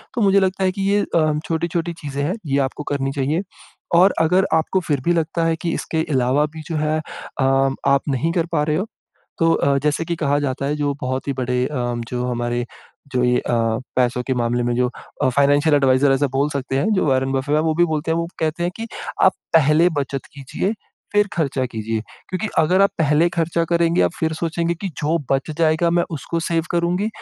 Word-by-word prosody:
तो 240 - 0
मुझे 200 -1 +5
लगता 190 0 0
है 185 - +3
कि 195 - -5
ये 205 0 +3
अ, - - +5
हम 155 -1 +1
छोटी-छोटी 170 +1 -2
चीज़ें 145 -3 -5
हैं, 160 +6 0
ये 140 -2 0
आपको 150 - -8
करनी 135 -1 -1
चाहिए 150 +7 0 0.5
और 185 +3 +6
अगर 180 +4 +3
आपको 160 +4 +2
फिर 145 -3 0
भी 175 - +3
लगता 165 0 0
है 165 0 +2
कि 170 -2 -1
इसके 160 -1 -2
अलावा 130 +2 +2
भी 160 - -6
जो 165 - -2
है 155 +1 0 0.4
अम, 135 0 +2
आप 140 0 +4
नहीं 140 +5 0
कर 170 -2 +1
पा 150 -2 +2
रहे 150 0 0
हो, 190 - -1 0.5
तो 165 0 +4
अ, 140 0 +2
जैसे 150 +2 +1
कि 170 0 -2
कहा 145 -3 +1
जाता 140 -1 -2
है 145 +1 -1
जो 145 -1 -1
बहुत 130 +2 -3
ही - - +1
बड़े 125 0 0
अम, 120 -4 -2
जो 125 0 -3
हमारे 120 0 -1 0.5
जो 125 -1 +1
ये 125 0 +3
अ, - - -3 0.4
पैसों 125 -1 +1
के 130 - 0
मामले 120 0 0
में 120 0 0
जो 125 0 +2 0.3
अ, - - +4
फ़ाइनेंशियल 145 +3 +3
एडवाइज़र 135 0 +4
ऐसा 140 +2 +2
बोल 140 +2 +1
सकते 135 -1 -2
हैं 215 +10 +1
जो 185 - +1
वॉरेन 135 -1 +1
बफ़ेट 135 +2 0
है 155 - +2
वो 160 -1 +1
भी 175 +2 +4
बोलते 160 0 -2
हैं 165 - +1
वो 170 0 -2
कहते 160 +1 -1
हैं 175 - -1
कि 230 - -5 0.4
आप 190 - +6 0.2
पहले 160 +2 +5
बचत 135 -1 -4
कीजिए 145 - -3 0.4
फिर 205 0 +3
ख़र्चा 140 -5 0
कीजिए 110 -2 -3 0.3
क्योंकि 185 +4 -2
अगर 180 +5 +4
आप 200 - +4
पहले 155 +2 +3
ख़र्चा 170 0 0
करेंगे, 170 0 +2
आप - - +2
फिर 160 -1 0
सोचेंगे 170 +1 -1
कि 190 +4 -5
जो 155 +3 +1 0.2
बच 135 +3 0
जाएगा 160 +1 +3
मैं 175 0 +2
उसको 165 +4 -3
सेव 165 -1 0
करुँगी 175 +4 +1
150 Hz, 220 wpm, -21 LUFS, 135-170 Hz, 0.5 s, और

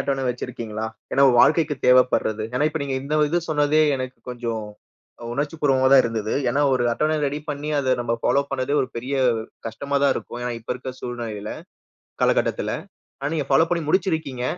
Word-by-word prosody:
அட்டவணை 135 -1 -1
வச்சிருக்கீங்களா? 115 -3 -4 0.3
ஏன்னா 140 - +5
வாழ்க்கைக்கு 155 +3 +4
தேவைப்படுறது, 125 -4 +3
ஏன்னா 145 +4 +2
இப்ப 155 +1 -4
நீங்க 140 -1 -2
இந்த 145 +3 -3
இது 175 - +1
சொன்னதே 150 0 +3
எனக்குக் 130 -2 -7
கொஞ்சோம் 115 -3 -4 0.7
உணர்ச்சிபூர்வமா 140 -1 +1
தான் 135 - +8
இருந்தது. 110 -2 -2 0.2
ஏன்னா 140 - +1
ஒரு 125 -2 +1
அட்டவணை 155 +5 +1
ரெடி 145 +2 -3
பண்ணி, 145 +1 -5
அத 130 -2 +2
நம்ப 120 -1 0
ஃபாலோ 140 - +3
பண்ணதே 135 +1 -1
ஒரு 130 - -4
பெரிய 125 +4 -3 0.5
கஷ்டமாதான் 140 +5 0
இருக்கும். 120 - -6
ஏன்னா 125 - -2
இப்ப 115 - -4
இருக்கிற 130 +1 -6
சூழ்நிலையில, 115 -4 -5 0.7
கால - - +4
கட்டத்துல. - - -1 0.5
ஆனா 140 +3 -3
நீங்க 145 -4 -2
ஃபாலோ 160 +5 +5
பண்ணி 170 -2 +1
முடிச்சிருக்கீங்க. 160 -8 0
135 Hz, 165 wpm, -23 LUFS, 120-145 Hz, 0.7 s, தான்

